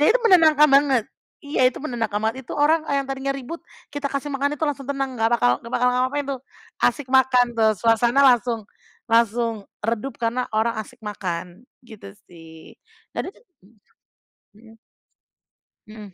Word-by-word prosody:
ya 300 - +4
itu - - +4
menenangkan 315 -7 +6
banget 275 -4 +4 0.4
iya 285 -3 +2
itu 255 - -8
menenangkan 230 -7 -2
banget, 235 +3 -3
itu - - -7
orang 310 +2 +2
yang 280 -1 +1
tadinya 270 0 -2
ribut 275 +5 -7 0.3
kita 290 0 -4
kasih 280 +1 -4
makan 280 +1 -1
itu - - -12
langsung 280 -2 -4
tenang 270 -3 -3
gak 225 - +2
bakal 120 - +3
gak 235 - -11
bakal 250 +1 +2
ngapa-ngapain 255 +3 0
tuh, 265 -2 -4 0.5
asik 290 -3 -2
makan 260 -1 +4
tuh, 220 -1 +4
suasana 235 +4 +3
langsung 240 -3 +3 0.5
langsung 230 -1 +1 0.2
redup 230 +3 -2
karena 240 +2 -1
orang 225 +2 +1
asik 245 +2 -13
makan 185 0 -6 0.2
gitu 205 -4 -12 0.2
sih. 165 -2 -15 0.3
Tadi - - -4
tu - - -23
mmm, 230 - -29 0.6
mhm. 225 +1 -17 1.1
Mhm. 215 -2 -12
250 Hz, 160 wpm, -22 LUFS, 220-275 Hz, 1.1 s, menenangkan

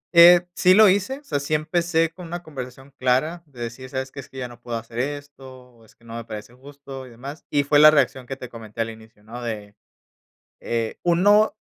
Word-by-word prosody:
Eh, 175 +1 +9
sí 185 0 +5
lo 215 0 +8
hice, 205 +9 0
o - - -31
sea, 145 - -2
sí 145 +2 -1
empecé 165 +1 +1
con 175 0 -10
una 175 +1 -6
conversación 135 -2 -9
clara, 130 +7 +1
de 125 -4 -13
decir: 120 +3 -6
"¿Sabes 130 0 -4
qué? 140 - -9
Es 135 - -10
que 135 - -13
ya 125 -1 -3
no 120 0 -14
puedo 120 -1 -4
hacer 115 +1 -7
esto 135 -2 -6
o 115 -2 -22
es - - -23
que 115 - -25
no 115 - -10
me 115 - -5
parece 110 +1 -9
justo 135 0 -11
y - - -13
demás". 135 +6 -9
Y 145 -1 +2
fue 145 +1 +4
la 155 - +10
reacción 135 -4 +1
que 135 - -4
te 125 -2 -8
comenté 115 -1 -7
al 115 0 -2
inicio, 110 -1 -16
¿no? 120 +3 -9
De, 105 -3 -6 0.8
eh, 115 -1 -2
uno 205 +6 +4
135 Hz, 230 wpm, -23 LUFS, 120-160 Hz, 0.8 s, la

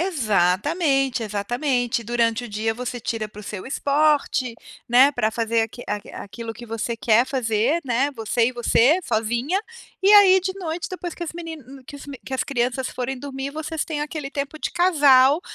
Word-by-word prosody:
Exatamente, 270 - +1
exatamente, 240 +3 -1
durante 235 0 0
o - - -7
dia 215 +2 -1
você 245 +1 -5
tira 220 -1 -3
para 210 0 -12
o - - -11
seu 200 -2 -7
esporte, 280 -3 +1 0.3
né, 255 +4 +6
pra 245 -6 0
fazer 230 0 0
aqui 225 +2 -6
a 210 -1 -5
aquilo 225 +2 -8
que 240 - -10
você 230 0 -4
quer 230 +2 +3
fazer, 255 +3 0
né, 255 +3 +1
você 230 0 0
e 255 - -1
você, 245 +6 +3
sozinha. 240 - -1 0.4
E 390 - +3
aí 385 -2 +8
de 375 +1 -2
noite, 340 -2 -4
depois 360 -2 -6
que 345 - -5
as 330 - -6
menin 310 -6 -9
que 285 - -10
os 285 - -12
me 280 - -7
que 265 - -9
as 260 - 0
crianças 255 -1 -1
forem 255 +1 -4
dormir, 270 0 -5
vocês 315 +1 -4
têm 305 -2 -4
aquele 295 -2 -5
tempo 280 +2 -4
de - - -3
casal, 290 -5 +5
255 Hz, 185 wpm, -23 LUFS, 230-300 Hz, 0.4 s, aí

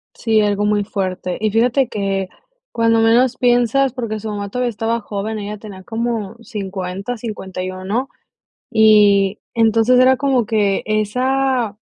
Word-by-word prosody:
Sí, 220 -2 +1
algo 205 -1 +1
muy 205 -1 +1
fuerte. 185 -3 -3
Y 215 0 +1
fíjate 245 +4 +2
que 195 -2 -2 0.4
cuando 230 -1 +2
menos 235 +3 +3
piensas, 245 +2 +2
porque 230 -4 -4
su 220 - -6
mamá 205 -1 -4
todavía 250 +2 -1
estaba 225 +1 -2
joven, 210 +1 -4
ella 210 0 -6
tenía 200 -3 -10
como 225 -1 -3
50, 195 +1 -5
51, 190 +1 -4 0.6
y 210 -2 +4 0.2
entonces 225 +2 +3
era 260 +1 +5
como 260 -4 +1
que 210 -3 +1
esa, 245 +1 0
220 Hz, 135 wpm, -18 LUFS, 200-240 Hz, 0.6 s, era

